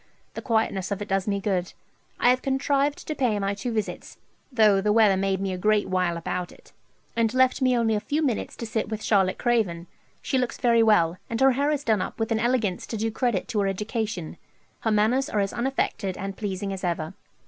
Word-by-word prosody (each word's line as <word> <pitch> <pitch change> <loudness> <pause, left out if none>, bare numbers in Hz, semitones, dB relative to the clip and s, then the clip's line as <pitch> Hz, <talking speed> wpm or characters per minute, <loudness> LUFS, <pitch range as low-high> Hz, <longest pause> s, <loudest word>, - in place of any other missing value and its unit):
The - - -6
quietness 220 -5 0
of 200 -1 -2
it 205 - -12
does 195 0 0
me 200 -1 0
good. 190 -2 -1 0.5
I 245 - +5
have 255 0 +1
contrived 275 +1 0
to 310 - -1
pay 245 -7 +1
my 200 0 -1
two 205 +5 -4
visits, 215 -2 -4 0.3
though 215 -5 +4
the 210 +1 +1
weather 210 -3 +5
made 190 0 0
me 195 -1 -2
a 180 - -5
great 210 +1 +2
while 180 -2 0
about 175 +1 -4
it, - - -19 0.4
and 230 -1 +2
left 260 +2 +3
me 255 -1 +3
only 225 -1 +2
a 210 - +1
few 295 +8 -1
minutes 250 -7 -1
to 230 - -6
sit 220 -1 -2
with 220 -1 -4
Charlotte 190 -3 +2
Craven. 210 -9 0 0.4
She 265 - 0
looks 250 -1 -2
very 235 -2 +3
well, 180 -6 +3
and 230 - -2
her 270 0 +6
hair 280 +3 +1
is 295 -2 -1
done 220 -7 +2
up - - -5
with 225 +1 -1
an 220 - +2
elegance 235 -5 0
to 225 - -4
do 225 +1 -1
credit 225 -5 -1
to 215 -4 0
any 195 - +1
education. 210 -4 -3 0.4
Her 225 - -1
manners 220 +6 +2
are 210 - 0
as 195 -1 -1
unaffected 235 -6 -2
and 195 0 -5
pleasing 195 -1 -3
as 190 - -7
ever. 170 -1 -2
215 Hz, 225 wpm, -25 LUFS, 195-240 Hz, 0.5 s, her